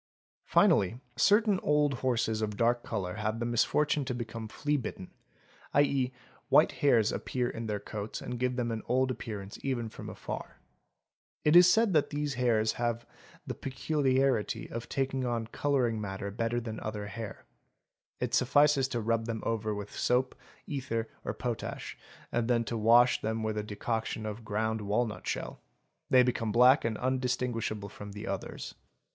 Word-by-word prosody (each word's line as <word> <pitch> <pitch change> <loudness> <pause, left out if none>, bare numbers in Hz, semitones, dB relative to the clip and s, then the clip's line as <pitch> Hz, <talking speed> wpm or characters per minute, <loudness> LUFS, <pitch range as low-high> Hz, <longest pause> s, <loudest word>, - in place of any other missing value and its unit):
Finally 100 +5 +3 0.2
certain 205 -1 +4
old 150 -1 +2
horses 115 -4 0
of 105 -1 -2
dark 120 +1 +2
colour 100 -3 -3
have 110 +1 -2
the 120 - -1
misfortune 145 +5 +2
to 130 -2 -3
become 115 -2 -5
fleabitten, 130 -7 -3 0.6
¢.c., 140 -3 +3 0.4
white - - +6
hairs 120 -7 +3
appear 125 -1 -2
in 115 -1 -5
their 105 -1 -2
coats 105 +1 -5
and 125 - -5
give 125 0 0
them 120 -2 -1
an 110 -1 -3
old 130 +2 +2
appearance 105 -5 -6
even 125 -4 -2
from - - -8
afar. - - -7 0.9
It 150 +2 +5
is 180 +1 +9
said 225 -3 +3
that 150 -3 +3
these 145 -1 -2
hairs 115 -3 +2
have 120 -1 -1 0.4
the - - -3
peculiarity 135 -3 0
of 115 0 -5
taking 135 -1 -1
on 120 -2 -1
colouring 120 -2 0
matter 100 0 -4
better 115 +3 -1
than 110 -2 -6
other 105 -1 -4
hair; 100 +1 -7 0.7
it - - -2
suffices 140 +1 +4
to 120 -3 -2
rub 115 0 0
them 115 -1 -3
over 110 -2 -1
with 105 0 -7
soap, 125 +1 +1 0.3
ether, 115 -5 -3
or - - -3
potash, - - -4 0.4
and 120 -1 0
then 120 -1 +2
to 115 - -4
wash 115 +3 +5
them 110 +1 -2
with 110 -1 -1
a 105 - -1
decoction 110 +1 -3
of 110 +2 -5
ground 110 +1 -1
walnut 105 +2 -1
shell; - - -4 0.5
they 130 -1 +7
become 115 -3 0
black 125 +5 +6
and 115 -2 -1
undistinguishable 125 -5 -1
from 105 0 -9
the 105 +1 -7
others. 100 -1 -5
115 Hz, 160 wpm, -30 LUFS, 110-130 Hz, 0.9 s, is